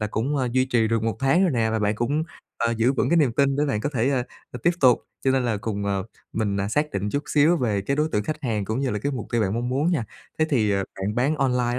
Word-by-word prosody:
là 105 - 0
cũng, 125 +7 -1
à, 130 -2 0
duy 130 +1 +3
trì 120 -4 +1
được 115 -1 0
1 115 0 -1
tháng 135 +7 +3
rồi 185 - +3
nè 115 -3 +1
và 110 - 0
bạn 105 0 +1
cũng, 135 +8 0 0.3
ờ, 115 - 0
giữ 120 +4 +3
vững 130 - 0
cái 170 - +4
niềm 145 -7 +3
tin 140 +2 +2
để 145 - +2
bạn 130 -7 -1
có - - -1
thể, 120 +1 +2
ơ, 130 -3 +1 0.3
ờ, 125 - -7
tiếp 175 - +4
tục, 125 -3 +5 0.2
cho 135 - +3
nên 130 -1 +2
là 115 -3 0
cùng, 100 -2 -3
ờ, 100 -1 0 0.3
mình, 105 -3 -1
à, 100 - -1
xác 150 +7 0
định 100 +1 -2
chút 145 - -1
xíu 155 +4 +4
về 110 -8 0
cái 140 +8 -1
đối 150 +1 +1
tượng 105 0 0
khách 155 +3 -4
hàng 110 -5 -1
cũng 110 +6 -2
như 135 -2 0
là 105 - -1
cái 140 +7 -2
mục 120 -5 -4
tiêu 120 - +2
bạn 100 0 0
mong 120 +1 -2
muốn 140 +7 +1
nha. 145 -10 0 0.3
Thế 155 - +4
thì, 110 -7 +2
ờ, 100 -1 +1 0.2
bạn 100 +2 -2
bán 135 +6 +1
online 125 -3 +1
125 Hz, 305 wpm, -24 LUFS, 110-140 Hz, 0.3 s, tục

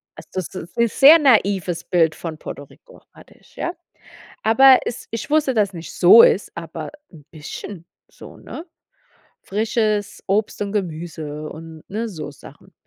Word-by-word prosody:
Also - - -13
das 185 -3 -5
ist 175 -1 -9
'n 235 0 +3
sehr 285 +8 +7
naives 200 - +2
Bild 165 -3 +1
von 160 -2 -7
Puerto 145 - -8
Rico, - - -20
hatte - - -18
ich, - - -25
ja. 345 - -3 0.7
Aber 260 +3 +6
es 240 - -6
ich 230 +4 -5
wusste, 300 -3 +2
dass 205 -2 +1
nicht 170 -1 -9
so 190 +6 +8
ist, 200 - +2
aber 165 -1 -7 0.2
'n 150 -4 -16
bisschen 165 +3 -9 0.2
so, - - -14
ne? 325 - -10 0.8
Frisches 215 0 -2
Obst 205 +2 -1
und 200 - -2
Gemüse 155 -5 -5
und 160 0 -11
ne, 220 +4 -3
so 155 -6 -7
Sachen 140 - -16
195 Hz, 160 wpm, -20 LUFS, 165-230 Hz, 0.8 s, so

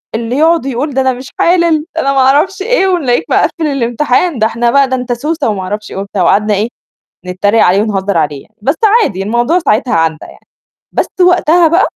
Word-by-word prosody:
اللي 235 +3 -3
يقعد 325 -1 +2
ويقول 275 +2 -3
ده 265 - +1
أنا 260 0 +1
مش 255 +2 -10
حالل 335 -3 +2
ده 325 - 0
أنا 275 -1 0
ما 270 - +1
أعرفش 295 +10 +2
إيه 415 -2 +1
ونلاقيك 290 -10 0
مقفِّل 325 -3 0
الامتحان 275 +3 0
ده 220 - +3
إحنا 235 +1 -1
بقى 280 -1 +3
ده 260 - 0
أنت 250 -1 -3
سوسة 295 +2 -2
وما 200 -3 -3
أعرفش 210 +3 -5
إيه" - - -7
وبتاع، 195 -1 -3
وقعدنا 210 +4 +2
إيه 205 +3 0 0.6
نتريق 200 +5 +1
عليه 190 +3 +3
ونهزّر 200 -3 -2
عليه 145 -3 -2
يعني، 220 - -28
بس 275 +7 +1 0.3
عادي 190 - -2
الموضوع 240 - +1
ساعتها 250 -6 0
عدّى 165 -1 +1
يعني، - - -18 0.5
بس - - 0
وقتها 355 -2 +4
بقى 340 +4 +2
255 Hz, 205 wpm, -12 LUFS, 210-315 Hz, 0.6 s, وقتها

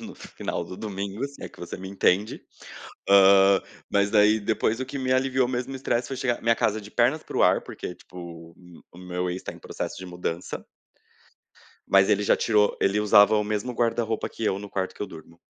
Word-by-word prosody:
no - - -9
final 85 - -5
do 90 +2 -9
domingo, 100 +2 -4
se 140 - -16
é - - -6
que - - -18
você 85 - -6
me 95 +1 -8
entende. 100 +1 +1 0.7
Hã, 100 0 +6 0.3
mas 100 0 +2
daí 105 0 +5
depois 110 +2 -1
o 130 - -3
que 140 +2 -6
me 130 -1 0
aliviou 130 -1 +1
mesmo 125 +1 -3
o - - -4
estresse 120 -2 -1
foi 135 - -4
chegar 125 -2 -1
minha 115 0 +3
casa 110 -1 0
de 105 0 -12
pernas 125 +8 +2
pro - - -1
ar, - - +4
porque 90 - -7
tipo 90 - -18
o 85 -1 -10 0.3
o 85 - -14
meu 90 0 -3
ex 90 +1 -5
tá - - -6
em - - -14
processo - - -6
de 95 - -8
mudança. 90 -1 -5 1.3
Mas 95 0 +5
ele 105 -1 +2
já 100 - +3
tirou 105 -2 +2
ele 100 +2 +2
usava 105 0 +6
o 105 - +1
mesmo 105 +4 -2
guarda-roupa 115 -1 -1
que 115 - -6
eu 95 -2 0
no 105 0 -8
quarto 95 -1 -3
que - - -6
eu - - -3
durmo, 85 -2 -14
105 Hz, 215 wpm, -25 LUFS, 95-115 Hz, 1.3 s, Hã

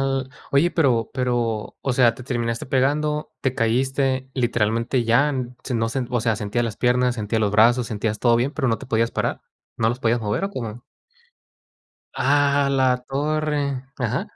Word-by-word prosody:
al 135 -1 -1 0.2
oye 150 +6 +3
pero 125 -8 +2
pero, 120 -4 -1
o 135 - -1
sea, 120 -2 +4
¿te 130 - -10
terminaste 115 -2 -2
pegando, 150 +3 0
te 130 -1 -1
caíste, 130 +3 0
literalmente 115 0 0
ya, 135 +6 +3 0.3
se 125 - -4
nos, 115 +1 -1 0.2
o 120 -2 0
sea, 115 -2 +1
sentías 110 +3 -1
las 110 -2 -4
piernas, 125 0 +2
sentías 110 0 -2
los 105 - +1
brazos, 120 +3 +4
sentías 105 -1 -2
todo 120 -1 +3
bien, 130 +5 0
pero, 145 -5 -1
no 115 -2 +1
te - - -10
podías 115 -1 +1
parar, - - -2 0.4
no 110 0 +2
los 120 +2 -3
podías 115 -1 +1
mover? 105 - -1
¿O 200 - -3
cómo? 120 - -6 1.4
A 140 0 +3
la 130 -2 +2
torre, 150 +1 0 0.4
ajá. 125 - -1
125 Hz, 170 wpm, -22 LUFS, 115-135 Hz, 1.4 s, sea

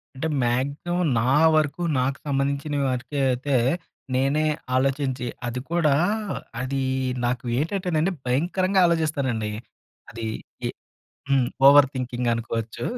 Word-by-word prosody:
అంటే 140 +5 -2 0.2
మాక్సిమం 140 +9 0
నా 125 +3 +1 0.2
వరకు 155 +2 +1 0.2
నాకు 135 +2 0
సంబంధించిన 140 +1 -1
వరికే 130 +3 -3
అయితే 135 +2 -1 0.6
నేనే 135 +4 +2 0.3
ఆలోచించి 130 -1 0 0.2
అది 120 +1 -3
కూడా 165 -4 +3 0.6
అదీ 135 +1 -2 0.4
నాకు 125 +1 -1
ఏటంటేనండి, 175 +1 0
భయంకరంగా 180 +9 +1
ఆలోచిస్తానండి. 140 -10 0 0.6
అది 115 -1 -6 0.4
ఎ - - -2 0.6
హ్మ్. 135 -3 +3 0.2
ఓవర్ 140 0 +8
థింకింగ్ 125 -1 -2
అనుకోవచ్చు. 115 -1 -4
135 Hz, 105 wpm, -24 LUFS, 125-155 Hz, 0.6 s, ఓవర్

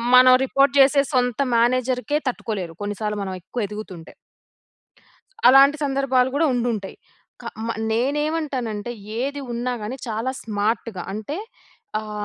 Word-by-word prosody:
మనం 255 0 +8
రిపోర్ట్ 275 0 +3
చేసే 275 +1 +6
సొంత 245 -2 +1 0.2
మేనేజర్‌కే 255 +4 +1
తట్టుకోలేరు, 205 -8 -3
కొన్ని 205 0 -3
సార్లు 210 -1 -1
మనం 190 -1 -4
ఎక్కువ 215 +5 -4
ఎదుగుతుంటే. 195 -5 -9 1.3
అలాంటి 275 +3 +7
సందర్భాలు 270 -2 +2
కూడా 320 +3 +3
ఉండుంటాయి. 230 -5 -2 0.5
క - - -15 0.2
మ - - -3 0.2
నేనేవంటానంటే, 260 -3 -1 0.3
ఏది 280 +3 -2
ఉన్నాగాని, 240 -1 -3
చాలా 225 +3 -2
స్మార్ట్‌గా 215 -2 -2
అంటే, 220 +9 -5 0.6
ఆహ్, 215 0 -8
245 Hz, 120 wpm, -22 LUFS, 215-270 Hz, 1.3 s, మనం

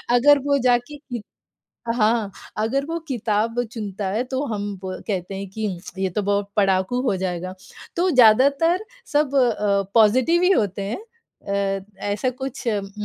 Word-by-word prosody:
अगर 285 +3 +6
वो 280 0 +3
जाके 245 +4 +1 1.0
हाँ। 215 -2 +2 0.3
अगर 255 +6 0
वो 330 +2 -3
किताब 230 -2 0
चुनता 205 -3 -4
है, 225 +4 0
तो 260 +2 -3
हम 205 0 -3 0.2
व 185 0 -5
कहते 195 -2 -3
हैं 195 +1 -5
कि 220 +2 -7 0.4
ये 190 -1 +1
तो 205 +4 -2
बहुत 200 0 0
पढ़ाकू 195 +4 +2
हो 250 -7 +1
जाएगा। 185 0 -3 0.4
तो 360 +2 +2
ज़्यादातर 275 - +5 0.3
सब 290 -1 +2
अ, 210 -6 +2
पॉज़िटिव 255 +10 +5
ही 365 - +5
होते 200 - +1
हैं। 235 - -3 0.8
अ, 190 - -16 0.3
ऐसा 210 +5 0
कुछ 260 0 -6
उम 200 -3 -1
225 Hz, 150 wpm, -22 LUFS, 200-265 Hz, 1.0 s, अगर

